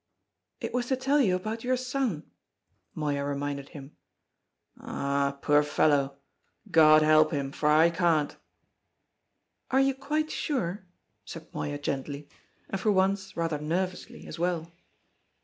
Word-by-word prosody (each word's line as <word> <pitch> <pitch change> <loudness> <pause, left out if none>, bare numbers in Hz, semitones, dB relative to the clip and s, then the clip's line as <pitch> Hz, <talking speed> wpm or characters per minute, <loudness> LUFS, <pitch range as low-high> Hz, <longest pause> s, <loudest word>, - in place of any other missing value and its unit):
"It - - -5
was 245 0 -1
to 265 - +1
tell 270 +3 +2
you 190 -8 +3
about 215 +5 -4
your 255 +1 +1
son," 250 - -3 0.6
Moya 145 -2 -1
reminded 140 0 -3
him. 140 0 -11 0.8
"Ah, 140 0 -1
poor 145 0 +5
fellow! 145 -2 +1 0.5
God 155 -1 +7
help 155 0 +5
him, 140 -3 -2
for 150 +1 0
I 160 +3 +5
can't." 165 -4 +1 1.3
"Are 265 - +3
you 270 0 +3
quite 300 +4 -2
sure?" 190 - -2 0.4
said 165 0 -10
Moya 145 0 -3
gently, 140 0 -4 0.4
and 195 - -4
for 215 - +2
once 195 0 0
rather 165 -3 -1
nervously 180 +4 -3
as 165 - -8
well. 170 -1 -1
165 Hz, 130 wpm, -28 LUFS, 145-210 Hz, 1.3 s, God